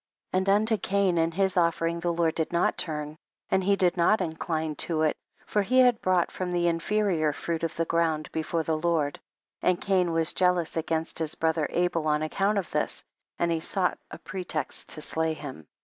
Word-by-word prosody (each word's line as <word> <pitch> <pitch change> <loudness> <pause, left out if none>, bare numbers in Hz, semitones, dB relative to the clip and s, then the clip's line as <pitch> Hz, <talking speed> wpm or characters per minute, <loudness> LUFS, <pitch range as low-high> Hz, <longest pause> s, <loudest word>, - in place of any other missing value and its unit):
16. - - +3
And 190 +1 -1
unto 215 +2 +3
Cain 195 -3 +1
and 165 0 +2
his 190 +2 +1
offer 170 -2 +2
ing 170 0 -1
the 170 0 0
Lord 165 -1 +1
did 160 - -2
not 170 0 +2
turn, 150 -2 -4 0.3
and 190 0 +3
he 200 +2 +3
did 185 -2 +1
not 175 +6 +4
incline 160 -1 -2
to 160 -2 0
it, 155 - +2 0.3
for 210 - +1
he 250 +6 +1
had 245 -3 +4
brought 185 -2 +2
from 185 -1 -3
the 175 -1 +1
inferior 170 -2 +1
fruit 165 +2 -3
of 165 -1 -2
the 165 - 0
ground 160 -2 0
before 160 +1 -1
the 155 0 -1
Lord, 155 -3 0 0.4
and 180 -1 +2
Cain 185 -3 +1
was 165 0 +1
jealous 180 -3 +1
against 160 0 -1
his 160 -1 -3
brother 160 -2 +1
Abel 170 -2 0
on 150 0 +2
account 195 +6 0
of 190 -4 -2
this, - - -2 0.3
and 170 0 +1
he 165 - +1
sought 180 +2 -1
a - - -8
pretext 180 -6 -4
to 155 - -3
slay 160 0 0
him. 130 - -9
170 Hz, 205 wpm, -27 LUFS, 160-185 Hz, 0.4 s, not